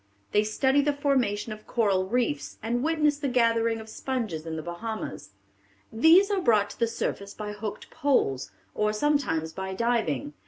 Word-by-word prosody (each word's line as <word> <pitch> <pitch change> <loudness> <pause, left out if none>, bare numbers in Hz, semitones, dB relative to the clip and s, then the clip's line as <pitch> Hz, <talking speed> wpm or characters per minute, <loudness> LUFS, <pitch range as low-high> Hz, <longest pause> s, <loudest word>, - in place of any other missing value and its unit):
They 210 - +3
study 265 +6 +2
the 290 +1 +1
formation 255 -7 0
of 215 0 -13
coral 195 -5 +1
reefs, 205 - -1
and 240 +2 0
witness 300 -1 +2
the 285 - -1
gathering 230 -2 +2
of 220 - -9
sponges 220 -10 -4
in 160 - -3
the 155 - -5
Bahamas. 175 - -5 0.6
"These 330 - +6
are 395 -2 +1
brought 210 - +3
to - - -13
the 230 - +3
surface 200 -3 -4
by 210 -1 -5
hooked 210 0 -6
poles, 255 - +1 0.2
or 210 0 0
sometimes 215 - 0
by 190 +2 -5
diving. 200 - 0
225 Hz, 165 wpm, -27 LUFS, 200-265 Hz, 0.6 s, These